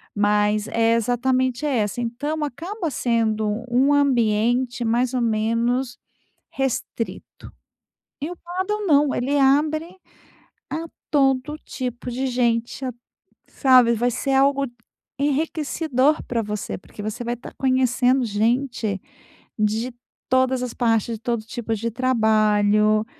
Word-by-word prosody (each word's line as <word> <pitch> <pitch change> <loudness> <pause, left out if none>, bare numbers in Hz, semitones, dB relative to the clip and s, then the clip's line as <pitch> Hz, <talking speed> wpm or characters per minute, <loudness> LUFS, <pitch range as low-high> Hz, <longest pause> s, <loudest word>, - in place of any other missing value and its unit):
mas 210 +1 +2
é 230 0 +2
exatamente 250 +3 0
é 280 -4 +1
essa. 210 +3 -1
Então, 290 +7 -3
acaba 335 - -4
sendo 220 -4 0 0.2
um 260 +4 +3
ambiente 245 -2 +2
mais 240 +2 +1
ou 250 - 0
menos 235 +3 0 0.5
restrito. 260 -3 -4 0.7
E 300 +4 -3
o 355 - -7
padel 375 +5 -3
não, 290 -3 +4
ele 275 +4 0
abre 310 +6 +2 0.7
a 320 +4 -3 0.3
todo 270 0 +2
tipo 250 -4 -5
de 260 +2 -2
gente, 240 0 0
a 255 - -2 0.6
sabe, 255 -3 +5
vai 240 +2 +1
ser 270 +3 -2
algo 275 +1 +3 0.5
enriquecedor 295 -1 0
para 235 -2 -2
você, 210 -1 -4
porque 205 +2 -11
você 215 +3 -4
vai 240 +1 -2
estar 240 - -11
conhecendo 255 -1 +2
gente 225 -1 0 0.6
de 220 +3 0 0.4
todas 260 0 +2
as 250 - -4
partes, 230 -1 +1
de - - -24
todo 235 -1 -2
tipo 225 -1 -3
de 230 +2 -3
trabalho. 215 -3 +3
245 Hz, 125 wpm, -22 LUFS, 225-270 Hz, 0.7 s, sabe